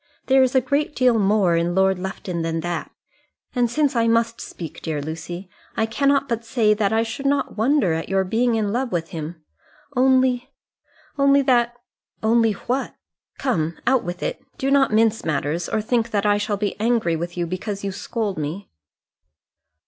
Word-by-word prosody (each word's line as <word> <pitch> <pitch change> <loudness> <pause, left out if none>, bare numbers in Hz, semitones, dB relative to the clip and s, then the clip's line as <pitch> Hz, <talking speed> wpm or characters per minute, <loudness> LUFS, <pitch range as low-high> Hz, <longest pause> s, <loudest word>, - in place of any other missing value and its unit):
There 265 0 +5
is 260 0 +2
a 260 - +5
great 285 +4 -1
deal 250 -3 +3
more 195 -3 +3
in 170 +1 0
Lord 190 -1 +3
Lufton 180 -2 -4
than 165 0 -2
that; 175 +1 -3 0.6
and 245 -2 +2
since 290 +1 +1
I 230 -1 +3
must 230 0 +1
speak, 165 -4 -8
dear 155 -2 -2
Lucy, 165 +5 -6 0.3
I 220 - +2
cannot 275 +4 +1
but 230 -2 -2
say 225 -2 +2
that 210 -2 0
I 225 0 +2
should 230 +5 -4
not 285 0 0
wonder 220 - +2
at 165 0 -3
your 195 0 +2
being 230 +5 +1
in 210 -2 0
love 250 0 -1
with 165 -2 -2
him, 160 0 -7 0.5
only 255 0 +3 0.7
only 280 0 +5
that 240 -2 +2 0.2
" - - -44
"Only 225 0 +3
what? 250 +6 -3 0.4
Come, 170 - -1
out 260 0 +3
with 175 0 -5
it. - - -3
Do 270 +1 -1
not 275 -3 +4
mince 225 0 +2
matters, 155 +2 -1
or 215 - -1
think 235 0 0
that 205 -2 0
I 205 0 +3
shall 205 0 -1
be 205 -1 -2
angry 220 -7 +1
with 170 +2 -5
you 175 - 0
because 195 +4 -4
you 200 - -2
scold 205 -1 -3
me." 155 +7 -5
220 Hz, 185 wpm, -22 LUFS, 180-245 Hz, 0.7 s, There